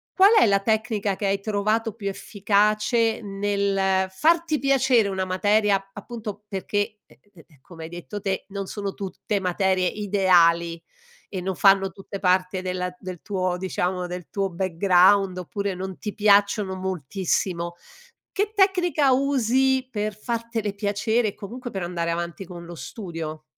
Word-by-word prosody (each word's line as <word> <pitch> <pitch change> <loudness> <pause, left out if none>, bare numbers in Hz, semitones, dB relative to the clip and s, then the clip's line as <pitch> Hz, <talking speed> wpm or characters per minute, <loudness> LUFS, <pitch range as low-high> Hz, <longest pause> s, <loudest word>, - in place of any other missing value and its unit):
Qual 395 +3 +7
è 430 - +6
la 200 -2 +3
tecnica 215 -1 0
che 205 - -4
hai 195 0 +1
trovato 215 +2 0
più 210 -3 -6
efficace, 215 +3 +1
nel 195 -2 0
farti 320 - +2
piacere 265 -5 +3
una 190 -1 -2
materia, 195 +1 +1
appunto, 210 -1 -7
perché, 205 +1 -2
ehm - - -22 0.2
ehm, 160 -5 -20
come 165 +2 -11
hai 160 - -8
detto 175 +4 -7
te, 190 -1 -2
non 195 -1 -5
sono 200 -2 -4
tutte 200 +1 -3
materie 185 0 +1
ideali, 175 -5 +3 0.5
e 185 -2 -4
non 190 0 -3
fanno 195 0 +4
tutte 195 +1 -8
parte 185 0 +1
della 180 -1 -3
del 185 -3 -8
tuo 185 -3 -1
diciamo, 180 0 -2
del 180 0 -7
tuo 195 -1 -1
background 185 +2 +3
oppure 200 +2 -3
non 190 0 -6
ti 210 - -5
piacciono 200 -1 +3
moltissimo. 180 -1 -2 0.6
Che 415 +1 -1
tecnica 355 -8 +3
usi 265 0 +2
per 210 -2 -3
fartele 230 -2 -3
piacere 210 +3 0
e - - -18
comunque 240 +5 -8
per 195 -4 -4
andare 170 -1 -2
avanti 170 +2 -4
con 170 -1 -9
lo 175 - -8
studio? 165 -5 -7
200 Hz, 150 wpm, -24 LUFS, 185-215 Hz, 0.6 s, Qual